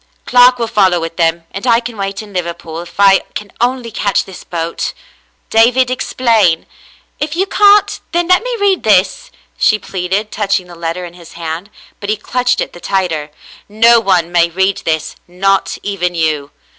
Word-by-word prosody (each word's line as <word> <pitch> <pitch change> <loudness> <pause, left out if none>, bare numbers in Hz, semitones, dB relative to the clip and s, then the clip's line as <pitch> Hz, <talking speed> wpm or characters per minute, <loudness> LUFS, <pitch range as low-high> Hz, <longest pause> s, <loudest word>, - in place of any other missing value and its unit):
"Clark 250 0 +5
will 235 - -1
follow 195 -6 +2
with 165 0 -6
them, 165 0 +1
and 195 +6 -5
I 230 -1 +5
can 240 -1 -7
wait 195 0 -4
in 205 -1 -14
Liver 170 -2 -2
pool, 165 -1 -8
if 175 +2 -13
I 195 -1 +6 0.2
can 205 -2 -6
only 245 -1 -1
catch 200 -2 0
this 190 - -11
boat." 165 -1 -4 0.6
"David, 250 +3 +4
explain. 225 -9 +1 0.5
If 300 +1 -3
you 375 +3 +1
can't, 410 0 +4
then 345 0 0
let 365 0 +4
me - - -3
read 400 -2 +2
this," 215 - +2 0.3
she 215 - +4
pleaded, 195 +2 -3
touching 200 -3 -1
the 175 - -13
letter 170 +1 -4
in 175 - -10
his 170 -2 -14
hand; 165 +3 -6 0.3
but 200 - -6
he 215 - +1
clutched 250 +2 0
it - - -4
the 175 - -11
tighter. 170 -7 -1 0.4
"No 230 +3 +5
one 180 -5 +1
may 170 -1 +3
read 190 +3 0
this, 160 -1 -2
not 195 +2 0
even 180 -3 -2
you." 155 -3 -1
195 Hz, 180 wpm, -15 LUFS, 175-235 Hz, 0.6 s, I